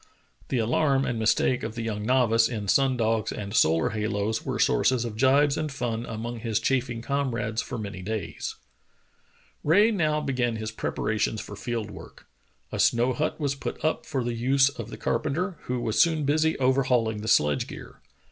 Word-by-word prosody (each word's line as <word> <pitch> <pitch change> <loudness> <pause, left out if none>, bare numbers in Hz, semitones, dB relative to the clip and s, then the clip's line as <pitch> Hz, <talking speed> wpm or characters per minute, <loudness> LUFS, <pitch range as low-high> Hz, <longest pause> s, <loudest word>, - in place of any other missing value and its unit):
" - - -32
The 130 - 0
alarm 135 +4 +2
and 115 - -2
mistake 110 +3 +2
of 110 0 -5
the 115 - -4
young 105 -2 -3
novice 115 -2 +3
in 105 -4 -4
sun 135 +4 +3
dogs 115 -1 0
and 100 -1 -6
solar 80 -6 +3
halos 110 0 -1
were - - -3
sources 125 -2 +2
of 115 -3 -5
gibes 140 +4 +3
and 155 -1 -2
fun 120 -3 -3
among 115 +2 -5
his 110 -2 -1
chaffing 120 -3 -1
comrades 120 -5 -1
for 125 - -6
many 100 -3 -6
days. 110 +2 -4 1.1
Rae 205 +9 +5
now 155 -7 +1
began 125 -5 -1
his 110 0 -4
preparations 110 +1 -1
for 105 - -8
field 110 0 -4
work. - - -12 0.5
A - - -4
snow 120 +2 +3
hut 155 +3 -2
was 140 -3 0
put 140 - -5
up 155 - -1
for 135 -5 -1
the 120 0 -2
use 135 +4 +3
of 115 -6 -8
the - - -8
carpenter, 160 +9 -1
who 125 0 -2
was 115 -2 +1
soon 160 -3 +2
busy 155 +3 +2
overhauling 125 -5 +1
the 110 - -6
sledge 75 - +3
gear. - - -11
120 Hz, 185 wpm, -26 LUFS, 110-135 Hz, 1.1 s, Rae